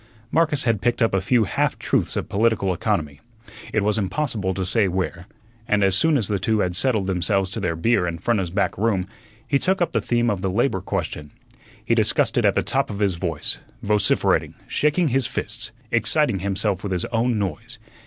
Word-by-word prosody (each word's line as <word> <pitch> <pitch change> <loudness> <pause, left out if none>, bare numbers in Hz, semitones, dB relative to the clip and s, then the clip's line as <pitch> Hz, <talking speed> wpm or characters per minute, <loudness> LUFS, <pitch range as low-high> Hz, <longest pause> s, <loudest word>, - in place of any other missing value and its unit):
Marcus 160 -4 +2
had 115 -4 +1
picked 120 - +1
up 115 -4 +2
a 95 - +2
few 115 +4 +3
half - - 0
truths - - 0
of - - -2
political 100 -3 +1
economy 80 -7 -2 0.5
it 105 - +1
was 105 +2 +1
impossible 105 -2 -1
to 95 0 -3
say 100 +2 +3
where 90 -1 -3 0.4
and 105 -3 +2
as 95 -1 +4
soon 155 +8 +3
as 110 -7 0
the 100 -2 -1
two 110 +3 +1
had 90 -1 -1
settled 110 -1 +1
themselves 95 +1 0
to 105 - -4
their 90 -4 -1
beer 90 +1 +1
in 85 -1 -3
Frenna's 95 -2 0
back 100 +3 0
room 100 -4 +1 0.4
he 140 - +2
took 190 +4 +1
up 175 - +1
the 115 - 0
theme 120 +1 +1
of 100 -3 -3
the 95 - -1
labor 100 0 0
question. 75 -4 -4 0.6
He - - +2
discussed - - +2
it - - +2
at - - +3
the - - +1
top - - 0
of 100 - -5
his 100 -2 +1
voice, 85 -4 -2 0.2
vociferating, 105 0 +2
shaking 150 +2 +1
his 130 -1 +1
fists, 115 -2 -4 0.2
exciting 115 -1 +2
himself 100 0 -1
with 100 -2 -3
his 90 - -1
own 115 0 0
noise. 115 +5 -4
105 Hz, 205 wpm, -22 LUFS, 95-120 Hz, 0.6 s, as